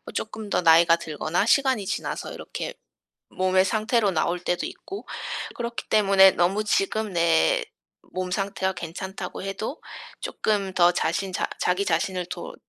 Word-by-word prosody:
쪼끔 215 -1 -4
더 - - +1
나이가 165 0 +6
들거나 165 +2 -2
시간이 260 -4 +3
지나서 - - -4
이렇게 - - -6 0.6
몸의 185 0 +2
상태로 215 +1 +1
나올 175 +1 0
때도 180 0 -1
있고 390 +1 -8 0.5
그렇기 235 0 -5
때문에 195 -2 +6
너무 190 +5 +1
지금 210 0 0
내 165 - +3 0.5
몸 185 0 -3
상태가 195 -1 -1
괜찮다고 185 +2 -6
해도 205 +8 -5 0.4
쪼끔 200 -3 -1
더 175 0 +5
자신 185 +3 -1
자 - - -1
자기 180 +2 +1
자신을 180 +1 -1
돌 - - -7
190 Hz, 295 characters per minute, -25 LUFS, 175-210 Hz, 0.6 s, 나이가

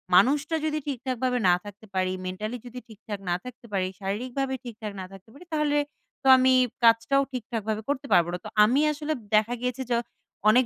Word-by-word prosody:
মানুষটা 290 - +4
যদি 310 0 0
ঠিকঠাকভাবে 255 -1 -1
না - - +7
থাকতে 205 +1 -11
পারি, 185 0 +1
মেন্টালি 210 +6 -4
যদি 245 +1 -8
ঠিকঠাক 215 -2 -8
না 175 - +2
থাকতে 250 -1 -10
পারি, 185 -2 +1
শারীরিকভাবে 250 +7 -2
ঠিকঠাক 220 -3 -6
না 185 - -5
থাকতে 195 +2 -14
পারি 320 +6 -14
তাহলে 300 -1 +2 0.4
তো - - -2
আমি 260 0 +4 0.3
কাজটাও 230 +4 +5
ঠিকঠাকভাবে 220 -3 -3
করতে 280 -1 -1
পারবো 170 0 +5
না।" - - -1
তো - - -5
আমি 240 +6 +4
আসলে 300 +1 -2 0.2
দেখা 215 +3 +3
গিয়েছে 250 +1 -2
য - - +4 0.6
অনেক 250 +4 +5
240 Hz, 180 wpm, -26 LUFS, 210-265 Hz, 0.6 s, না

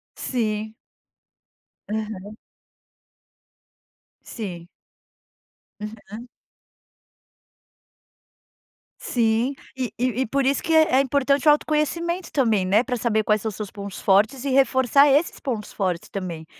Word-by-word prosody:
Sim. 220 -3 -2 1.1
Aham. 215 -1 -5 1.9
Sim. 175 -7 -7 1.1
Uhum. 215 +2 -9 2.7
Sim, 235 +3 +1 0.2
e 255 -2 -3
e 250 +1 0
e - - -6
por 275 +3 0
isso 275 0 +1
que 325 - -1
é 315 -5 +5
é - - +6
importante 280 +1 +1
o 300 - +9
autoconhecimento 335 +4 0
também, 225 -9 +2
né, 205 +5 +3
para 255 -2 -2
saber 220 -2 +1
quais 210 0 +1
são 220 - -2
seus 210 -1 -7
pontos 200 -1 -8
fortes 215 +7 +3
e 280 - -2
reforçar 265 +1 +4
esses 290 +5 +2
pontos 230 -6 -4
fortes 180 -4 -2
também, 175 -5 -5
230 Hz, 110 wpm, -23 LUFS, 210-275 Hz, 2.7 s, o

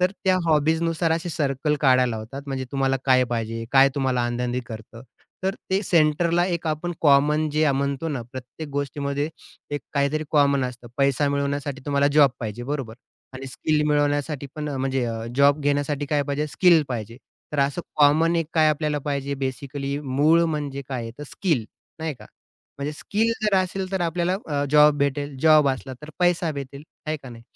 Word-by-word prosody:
तर 180 +1 +3
त्या 185 -1 +4
हॉबीजनुसार 160 +2 +2
असे 165 +2 -2
सर्कल 150 -1 0
काढायला 130 -3 +4
लावतात. 115 +6 -7
म्हणजे 135 -1 -3
तुम्हाला 135 -1 +1
काय 130 -1 +4
पाहिजे, 115 0 -3
काय 135 0 +7
तुम्हाला 130 -3 0
आनंदी 125 +1 -2
करतं. 115 +1 -10 0.4
तर 190 +1 0 0.2
ते 190 +1 +2
सेंटरला 170 0 +2
एक 170 -2 -2
आपण 155 +3 -2
कॉमन 150 +1 +4
जे 155 0 +2
म्हणतो 140 +3 -1
ना, 140 -5 -3
प्रत्येक 130 +4 -8
गोष्टीमध्ये 140 +1 -2 0.5
एक 145 - -2
काहीतरी 140 +2 +1
कॉमन 140 -3 +3
असतं. 120 -1 -7
पैसा 140 +1 +2
मिळवण्यासाठी 140 -1 -2
तुम्हाला 140 0 +2
जॉब 145 -3 +6
पाहिजे 115 +1 -5
बरोबर 130 -7 -3 0.4
आणि 135 +1 -7
स्किल 150 +3 0
मिळवण्यासाठी 145 -1 0
पण 150 -1 -4
अ, 140 - -3
म्हणजे 130 -1 -1
अ, 115 -1 -4
जॉब 140 +1 +4
घेण्यासाठी 145 0 0
काय 145 0 +1
पाहिजे, 145 +2 -2
स्किल 170 0 +4
पाहिजे. 115 -2 -5 0.4
तर 145 - -3
असं 140 +5 0 0.2
कॉमन 155 +3 +4
एक 165 -2 0
काय 155 -1 +5
आपल्याला 150 0 0
पाहिजे 140 -1 -2
बेसिकली 140 +2 -4
मूळ 150 +5 +3
म्हणजे 145 -3 -3
काय 120 -4 -4
तर - - -6
स्किल 155 - -1 0.3
नाही 160 -2 -3
का 105 -3 -14 0.5
म्हणजे 145 +2 -3
स्किल 220 +9 -1
जर 210 -2 +2
असेल, 185 +1 -1
तर 190 - -1
आपल्याला 175 +2 0
अं 145 -8 -2
जॉब 150 0 +6
भेटेल, 140 0 -1
जॉब 155 -3 +6
असला, 130 0 -3
तर 150 - -9
पैसा 175 -2 +2
भेटेल 140 0 -7 0.2
आहे 155 0 -1
का 135 -3 -12
नाही, 115 -1 -11
145 Hz, 175 wpm, -24 LUFS, 135-155 Hz, 0.5 s, काय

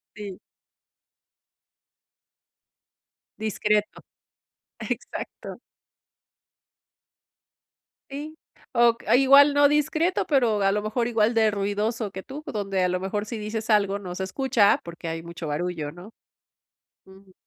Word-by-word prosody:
Sí. 200 -3 -8 3.0
Discreto. 210 -1 -1 0.8
Exacto. - - -6 2.5
Sí, 300 +3 -7 0.3
o 235 -1 +4
a - - +4
igual, 280 +2 +7
no 285 0 +6
discreto, 310 +4 +1
pero, 235 -8 +2
a 195 - +3
lo 210 +1 0
mejor, 230 +3 -1
igual 230 0 +1
de 220 -1 +4
ruidoso 205 +2 -2
que 190 0 -8
tú, 285 +3 -8
o, - - -6
donde, 195 -3 -1
a 180 - +2
lo 180 0 -1
mejor, 205 +2 -3
si 230 - -5
dices 215 +1 -5
algo, 200 -1 +2
no 180 -2 -7
se 190 - -3
escucha, 220 0 +2
porque 170 0 -8
hay 165 0 -4
mucho 170 -1 -8
barullo, 155 -1 -3
¿no? 180 +6 -12 0.9
Ujú. 190 0 -18
210 Hz, 120 wpm, -25 LUFS, 190-235 Hz, 3.0 s, igual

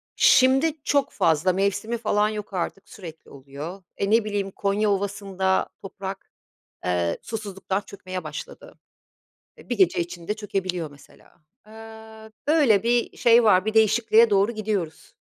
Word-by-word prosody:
Şimdi 275 +4 +4
çok 285 -1 +1
fazla 175 0 +2
mevsimi 200 +4 -1
falan 210 -2 +1
yok 210 -2 -6
artık, 190 +2 -4
sürekli 165 -5 -11
oluyor. 140 +7 -9
E, 200 - -1
ne 225 0 +4
bileyim, 200 -2 -2
Konya 205 +2 0
Ovası'nda 195 -1 -1
toprak, 195 0 -8 0.5
eee, 90 -1 0
susuzluktan 200 -3 -4
çökmeye 185 -3 -8
başladı. 155 - -9 0.8
Eee, - - -17
bir 245 - -2
gece 190 -3 +3
içinde 170 +2 -4
çökebiliyor, 185 -6 -4
mesela. 145 +4 -20 0.3
Eee, 220 0 -12 0.2
böyle 285 -10 +4
bir 235 0 0
şey 235 0 +5
var, 190 -2 +4
bir 220 - -1
değişikliğe 220 +1 +4
doğru 200 +3 +3
gidiyoruz. 205 -7 -4
200 Hz, 135 wpm, -24 LUFS, 185-220 Hz, 0.8 s, şey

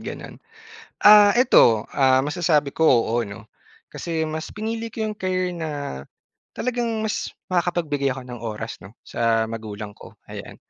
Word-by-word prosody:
gano'n. - - -7 0.7
Ah, 205 0 +8
eto, 115 - +5
ah, 130 -1 +3
masasabi 150 -3 +1
ko, 160 -1 +2
oo 120 -1 +3
'no. 105 +1 -11 0.4
Kasi 165 -2 -3
mas 155 +1 -4
pinili 225 +2 -3
ko 225 0 -5
'yong 215 0 -4
career 185 -1 -1
na, 165 -3 -5 0.9
talagang 245 -1 -1 0.2
mas 220 - -3 0.2
makakapagbigay 160 -7 0
ako 130 - -8
ng 125 -1 -9
oras 115 0 -6
'no 95 +6 -14
sa 115 -1 +1
magulang 110 -2 -7
ko - - -15 0.2
ayan. - - -8
155 Hz, 145 wpm, -23 LUFS, 115-185 Hz, 0.9 s, Ah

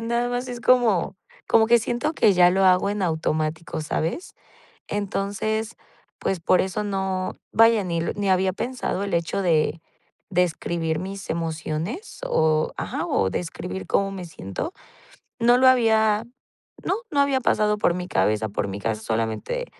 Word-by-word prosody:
nada 235 +1 0
más 245 +1 -3
es 240 -1 -6
como 230 -8 +3 0.3
como 220 -1 +5
que 235 0 +6
siento 240 +7 -1
que 215 -9 +4
ya 180 0 +6
lo 190 +1 +2
hago 185 +2 +4
en 205 -1 -2
automático, 160 -1 -1
¿sabes? 160 - -3 0.5
Entonces, 205 +2 -2 0.5
pues 190 - -1
por 180 - +3
eso 190 +3 -2
no 190 -2 -2 0.2
vaya, 225 -1 +5
ni 170 -2 -1
ni 195 +3 -1
había 185 0 +2
pensado 240 -2 -3
el 200 - -2
hecho 170 +3 -1
de 160 -2 +1 0.5
de 180 -1 +3
escribir 165 -1 -2
mis 195 +2 -6
emociones 165 - -4
oh, 155 -1 +2
ajá, - - -3
o 95 -1 +1
de - - -1
escribir 180 +2 -6
cómo 195 0 +1
me 185 -2 -6
siento. 160 - -6 0.7
No 240 +1 +5
lo 260 +1 +5
había 220 -3 +4 0.6
no - - 0 0.2
no 285 - +1
había 275 -2 +2
pasado 210 -2 +2
por 175 - +2
mi 180 0 -4
cabeza, 110 - +1
por 100 0 -2
mi 100 +1 -5
cabeza, 110 +1 -2
solamente 115 - -2
190 Hz, 160 wpm, -24 LUFS, 165-225 Hz, 0.7 s, que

